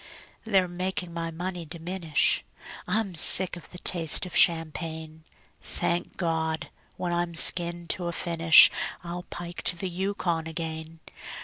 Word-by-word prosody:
They're 195 Hz, -4 st, +2 dB
making 180 Hz, 0 st, -4 dB
my 165 Hz, 0 st, -3 dB
money 175 Hz, +2 st, -5 dB
diminish; 165 Hz, 0 st, 0 dB, 0.4 s
I'm 210 Hz, -3 st, -1 dB
sick 180 Hz, +2 st, +4 dB
of 175 Hz, -, -9 dB
the 180 Hz, -, -11 dB
taste 170 Hz, -1 st, +1 dB
of 180 Hz, -, -8 dB
champagne. 160 Hz, -1 st, 0 dB, 0.4 s
Thank 175 Hz, +1 st, -3 dB
God! 160 Hz, -2 st, -2 dB, 0.3 s
when 175 Hz, -1 st, -3 dB
I'm 175 Hz, -1 st, -2 dB
skinned 170 Hz, +2 st, +2 dB
to 185 Hz, -3 st, -5 dB
a -, -, -2 dB
finish 165 Hz, -2 st, +6 dB, 0.3 s
I'll 175 Hz, +1 st, -7 dB
pike 175 Hz, 0 st, -7 dB
to -, -, +2 dB
the 190 Hz, +1 st, -3 dB
Yukon 175 Hz, -3 st, -2 dB
again. 160 Hz, 0 st, -6 dB
170 Hz, 135 wpm, -26 LUFS, 165-180 Hz, 0.4 s, finish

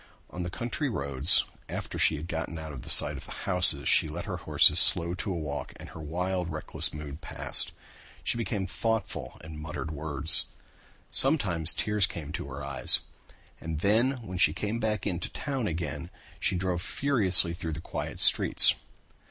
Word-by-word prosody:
On 90 Hz, -, -7 dB
the 90 Hz, -, -4 dB
country 120 Hz, -, -4 dB
roads 70 Hz, -, +1 dB, 0.2 s
after -, -, -6 dB
she 80 Hz, -, +3 dB
had 80 Hz, +2 st, -7 dB
gotten 80 Hz, -1 st, -5 dB
out 80 Hz, -1 st, -8 dB
of 65 Hz, -, -8 dB
sight -, -, +4 dB
of -, -, -11 dB
the -, -, -12 dB
houses 90 Hz, -6 st, +6 dB
she -, -, +4 dB
let 80 Hz, +3 st, -7 dB
the -, -, -5 dB
horses -, -, +5 dB
slow 85 Hz, 0 st, +3 dB
down 90 Hz, -, -5 dB
to 100 Hz, +2 st, -4 dB
a -, -, -3 dB
walk 75 Hz, -4 st, -6 dB
and -, -, -12 dB
her -, -, -12 dB
wild, 90 Hz, +3 st, -3 dB
reckless 80 Hz, -1 st, -1 dB
mood 75 Hz, 0 st, -9 dB
passed. 80 Hz, -, 0 dB, 0.5 s
She -, -, -1 dB
became 110 Hz, -4 st, -3 dB
thoughtful 110 Hz, +2 st, -4 dB
and 80 Hz, -1 st, -10 dB
muttered 80 Hz, +1 st, -6 dB
words. 75 Hz, 0 st, +2 dB, 0.6 s
Sometimes 95 Hz, -, +5 dB
tears 105 Hz, -3 st, 0 dB
came 80 Hz, -5 st, -8 dB
into 75 Hz, -, -6 dB
her 70 Hz, +1 st, -8 dB
eyes. 70 Hz, 0 st, +2 dB, 0.6 s
And 80 Hz, -2 st, -6 dB
then 115 Hz, +7 st, +2 dB
when 90 Hz, -2 st, -7 dB
she 75 Hz, -4 st, +4 dB
came 105 Hz, +6 st, -4 dB
back 110 Hz, -3 st, -2 dB
into 90 Hz, -3 st, -3 dB
town 135 Hz, -5 st, -4 dB
she -, -, -1 dB
again 80 Hz, -3 st, -5 dB, 0.3 s
drove 90 Hz, -1 st, -1 dB
furiously 95 Hz, -9 st, +2 dB
through 85 Hz, -2 st, -6 dB
the 80 Hz, -, -6 dB
quiet -, -, -7 dB
streets. -, -, +6 dB
85 Hz, 175 wpm, -27 LUFS, 80-100 Hz, 0.6 s, houses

